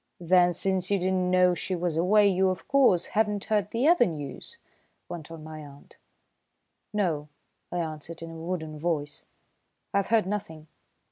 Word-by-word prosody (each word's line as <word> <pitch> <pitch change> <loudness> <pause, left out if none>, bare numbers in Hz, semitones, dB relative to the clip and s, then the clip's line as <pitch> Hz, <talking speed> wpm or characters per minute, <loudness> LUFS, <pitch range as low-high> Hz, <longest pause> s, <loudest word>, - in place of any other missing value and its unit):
"Then, 180 0 +4
since 185 0 0
you 200 - +2
did 185 0 0
not 185 -1 +1
know 180 0 +4
she 185 +1 -3
was 175 -2 -2
away, 200 +5 +4
you, 190 0 +3
of 185 - -4
course, 255 -11 +4
have 220 +1 +3
not 205 -1 -3
heard 210 -2 0
the 240 +6 +1
other 340 -8 +5
news?" 160 - -7 0.5
went 165 -3 -8
on 165 -2 -9
my 155 0 -8
aunt. 145 -1 -14 0.9
"No," 165 -8 -1 0.4
I 175 - -3
answered 165 0 -5
in 165 - -7
a - - -9
wooden 160 -2 -5
voice. 150 -3 -3 0.7
"I've 200 -1 +1
heard 225 -3 +3
nothing." 175 -6 -5
180 Hz, 175 wpm, -27 LUFS, 160-200 Hz, 0.9 s, other